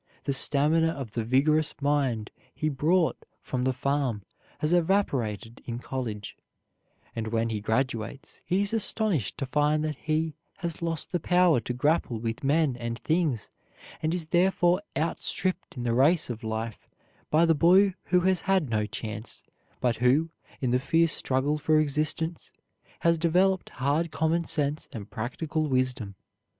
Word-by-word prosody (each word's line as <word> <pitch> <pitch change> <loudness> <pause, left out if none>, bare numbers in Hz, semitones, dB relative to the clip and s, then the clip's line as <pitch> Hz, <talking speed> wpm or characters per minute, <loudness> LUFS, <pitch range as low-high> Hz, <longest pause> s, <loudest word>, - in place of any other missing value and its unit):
The 140 - -1
stamina 150 +4 +3
of 140 -8 -4
the 115 0 -2
vigorous 145 +6 +2
mind 140 -7 0 0.2
he 155 - 0
brought 160 +5 +1 0.2
from 125 -1 -3
the 130 - +3
farm 130 -4 -1 0.3
has 155 +3 0
evaporated 135 - 0
in 120 -1 -4
college; 120 -5 -5 0.8
and 115 -1 -3
when 115 +1 0
he 110 -2 -3
graduates, 120 +5 -2
he 185 +3 +1
is 205 +2 0
astonished 210 - +1
to 135 - -2
find 150 +3 +1
that 155 -2 -2
he 155 +1 -1 0.2
has 170 -3 -5
lost 165 -2 -3
the 175 - 0
power 175 -3 +4
to 120 +2 -4
grapple 140 -2 +1
with 115 +2 -4
men 145 -1 +2
and 115 -1 -4
things, 155 - -1 0.5
and 155 - 0
is 175 -2 -2
therefore 180 +1 +3
out 165 +2 -1
stripped 185 -4 -3
in 120 - -3
the 120 -1 0
race 145 +4 +3
of 115 -1 -7
life 110 0 -4 0.4
by 160 +2 +4
the 165 - +4
boy 185 +6 +5
who 180 0 +3
has 185 -1 +2
had 185 -9 +1
no 105 -1 +1
chance, 110 +1 -6 0.4
but 120 -2 +1
who, 135 +7 +3 0.3
in 125 -2 0
the 125 - +3
fierce 165 +4 +2
struggle 140 +3 0
for 155 +1 +3
existence, 155 +3 -1 0.5
has 170 -1 +3
developed 185 +3 +2
hard 145 +6 0
common 160 +2 0
sense 150 0 -1
and 105 -4 -8
practical 150 +7 -2
wisdom. 125 -6 -1
145 Hz, 160 wpm, -27 LUFS, 120-165 Hz, 0.8 s, boy